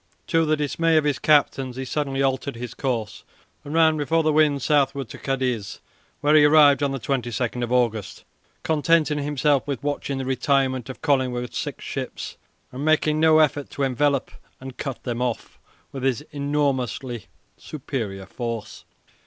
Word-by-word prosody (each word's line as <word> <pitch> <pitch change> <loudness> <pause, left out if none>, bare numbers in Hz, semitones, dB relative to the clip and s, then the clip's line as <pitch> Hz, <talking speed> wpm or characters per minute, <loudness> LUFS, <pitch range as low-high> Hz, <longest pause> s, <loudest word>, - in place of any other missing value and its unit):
To 165 -1 +2
the 155 0 +2
dismay 160 +3 +1
of 155 - +3
his 145 -3 0
captains 135 -4 +2
he 130 +1 -4
suddenly 135 0 -1
altered 135 0 -1
his 120 0 -6
course 120 -7 -3 0.4
and 145 - -8
ran 160 -1 +4
before 160 +2 +1
the 155 -1 +2
wind 150 -3 +3
southward 140 -4 +1
to - - -10
Cadiz, 130 -6 -2 0.4
where 145 +1 +3
he 155 -1 +7
arrived 145 -1 +6
on 135 -1 0
22 120 -3 -2 0.3
August, 115 -5 0 0.4
contenting 155 -1 +2
himself 145 -1 +1
with 140 -3 -4
watching 145 -1 -2
the 135 - -3
retirement 130 -1 0
of 130 - -9
Collingwood's 125 -5 0
six - - -5
ships - - -5 0.4
and 130 +3 -6
making 155 0 +2
no 160 0 +5
effort 145 -2 +2
to 140 +3 -3
envelop 135 +1 +1 0.3
and 130 -1 -9
cut 135 -3 -5
them 120 -1 -3
off 125 -2 -3 0.3
with 135 - -6
his 130 -2 0
enormously 140 -5 -2 0.3
superior 115 -10 -5
force. 115 +3 -6
135 Hz, 155 wpm, -23 LUFS, 125-150 Hz, 0.4 s, he